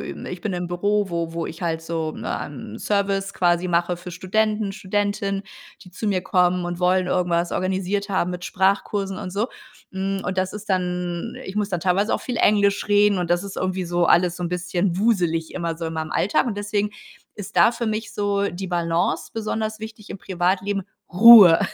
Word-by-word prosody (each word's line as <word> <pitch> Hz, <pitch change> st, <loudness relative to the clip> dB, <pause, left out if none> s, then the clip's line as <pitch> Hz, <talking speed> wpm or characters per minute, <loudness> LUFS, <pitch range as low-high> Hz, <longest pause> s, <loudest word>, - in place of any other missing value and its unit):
ich -, -, -7 dB
bin 215 Hz, -, -3 dB
im 180 Hz, 0 st, -3 dB
Büro, 205 Hz, +3 st, 0 dB
wo 170 Hz, -1 st, -2 dB
wo 165 Hz, 0 st, -3 dB
ich 165 Hz, +3 st, -8 dB
halt 165 Hz, -1 st, -1 dB
so, 165 Hz, -1 st, -3 dB
ähm, 125 Hz, -6 st, -6 dB
Service, 195 Hz, -1 st, -1 dB
quasi 175 Hz, 0 st, +2 dB
mache 175 Hz, +1 st, +1 dB
für 175 Hz, +1 st, -9 dB
Studenten, 210 Hz, +3 st, 0 dB
Studentinnen, 200 Hz, 0 st, -2 dB, 0.4 s
die 180 Hz, -, -15 dB
zu 200 Hz, +5 st, -5 dB
mir 195 Hz, -3 st, +1 dB
kommen 180 Hz, -1 st, +2 dB
und 175 Hz, 0 st, -4 dB
wollen 180 Hz, 0 st, +2 dB
irgendwas 175 Hz, -1 st, 0 dB
organisiert 190 Hz, +2 st, -1 dB
haben 185 Hz, -2 st, 0 dB
mit 180 Hz, 0 st, -6 dB
Sprachkursen 195 Hz, 0 st, 0 dB
und 185 Hz, -, -6 dB
so. 210 Hz, +5 st, -1 dB, 0.4 s
Hm, 195 Hz, 0 st, -2 dB
und 185 Hz, +1 st, -2 dB
das 185 Hz, 0 st, 0 dB
ist 210 Hz, 0 st, -9 dB
dann 180 Hz, +2 st, -2 dB
ich 190 Hz, +2 st, -7 dB
muss 205 Hz, -1 st, 0 dB
dann 175 Hz, -4 st, -2 dB
teilweise 190 Hz, +4 st, +1 dB
auch -, -, -2 dB
viel 250 Hz, -, -4 dB
Englisch 205 Hz, -2 st, +3 dB
reden, 205 Hz, -1 st, +4 dB
und 175 Hz, -1 st, -2 dB
das 175 Hz, +1 st, +2 dB
ist 200 Hz, -, -7 dB
irgendwie 185 Hz, 0 st, -2 dB
so 175 Hz, 0 st, +1 dB
alles 175 Hz, 0 st, +3 dB
so 180 Hz, -, -6 dB
'n 175 Hz, -, -1 dB
bisschen 180 Hz, +1 st, -1 dB
wuselig 175 Hz, -7 st, +1 dB
immer 170 Hz, -2 st, -3 dB
so 165 Hz, -, -5 dB
in 160 Hz, -, -4 dB
meinem 160 Hz, -1 st, -4 dB
Alltag. 205 Hz, -, +1 dB
Und 215 Hz, -4 st, -3 dB
deswegen 205 Hz, 0 st, -1 dB, 0.4 s
ist 200 Hz, -2 st, -9 dB
da 170 Hz, +7 st, +6 dB
für 235 Hz, 0 st, -3 dB
mich 220 Hz, +1 st, -3 dB
so 200 Hz, -1 st, 0 dB
die 190 Hz, +2 st, -6 dB
Balance 170 Hz, -1 st, -1 dB
besonders 220 Hz, -1 st, -3 dB
wichtig 220 Hz, -1 st, -9 dB
im 195 Hz, -, -6 dB
Privatleben. 190 Hz, +2 st, -1 dB, 0.3 s
Ruhe- 200 Hz, -4 st, +10 dB
185 Hz, 195 wpm, -23 LUFS, 175-205 Hz, 0.4 s, Ruhe